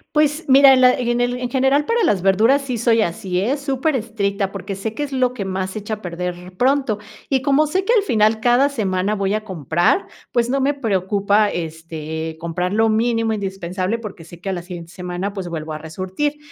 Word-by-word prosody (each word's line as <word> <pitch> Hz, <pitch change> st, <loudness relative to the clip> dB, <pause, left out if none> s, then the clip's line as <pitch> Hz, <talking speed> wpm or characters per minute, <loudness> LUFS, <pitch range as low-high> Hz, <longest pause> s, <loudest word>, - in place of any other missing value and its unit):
Pues 300 Hz, +1 st, +2 dB
mira, 270 Hz, 0 st, +8 dB
en 260 Hz, -, +4 dB
la 250 Hz, 0 st, +7 dB
en 240 Hz, -1 st, 0 dB
el 245 Hz, 0 st, 0 dB
en 250 Hz, -1 st, -4 dB
general, 270 Hz, +3 st, +2 dB
para 465 Hz, +4 st, +1 dB
las 200 Hz, -, +2 dB
verduras 225 Hz, +9 st, +4 dB
sí 250 Hz, -4 st, -3 dB
soy 230 Hz, -1 st, +3 dB
así, 180 Hz, 0 st, -2 dB
¿eh?, 255 Hz, +9 st, 0 dB
superestricta, 230 Hz, -8 st, -1 dB
porque 195 Hz, 0 st, -6 dB
sé 215 Hz, +3 st, -5 dB
que 295 Hz, -, -2 dB
es 285 Hz, -1 st, -5 dB
lo 255 Hz, -1 st, +1 dB
que 205 Hz, -5 st, -4 dB
más 190 Hz, 0 st, -2 dB
se 200 Hz, -, -5 dB
echa 215 Hz, +1 st, -4 dB
a 210 Hz, -, -16 dB
perder 180 Hz, 0 st, -5 dB
pronto, 260 Hz, -3 st, +2 dB, 0.3 s
y 265 Hz, -2 st, +1 dB
como 290 Hz, +2 st, +3 dB
sé 370 Hz, +5 st, -1 dB
que 470 Hz, -, +3 dB
al 450 Hz, -, +5 dB
final 220 Hz, -, +2 dB
cada 245 Hz, +5 st, +4 dB
semana 200 Hz, -6 st, -1 dB
voy 200 Hz, -1 st, 0 dB
a 215 Hz, -, -3 dB
comprar, 175 Hz, -, 0 dB, 0.2 s
pues, 240 Hz, -1 st, +1 dB
no 270 Hz, +1 st, +1 dB
me 280 Hz, +2 st, +2 dB
preocupa, 205 Hz, -3 st, +1 dB
este, 160 Hz, -1 st, -5 dB
comprar 180 Hz, +2 st, -2 dB
lo 225 Hz, +1 st, +3 dB
mínimo 225 Hz, 0 st, +1 dB
indispensable 190 Hz, +1 st, -3 dB
porque 210 Hz, -6 st, -8 dB
sé 170 Hz, +1 st, -13 dB
que 195 Hz, -, -4 dB
a -, -, 0 dB
la 175 Hz, -2 st, -5 dB
siguiente 175 Hz, -2 st, -9 dB
semana, 180 Hz, +2 st, -4 dB
pues 195 Hz, -3 st, -5 dB
vuelvo 160 Hz, -2 st, -5 dB
a -, -, -4 dB
resurtir. 190 Hz, -, -3 dB
215 Hz, 215 wpm, -20 LUFS, 185-255 Hz, 0.3 s, mira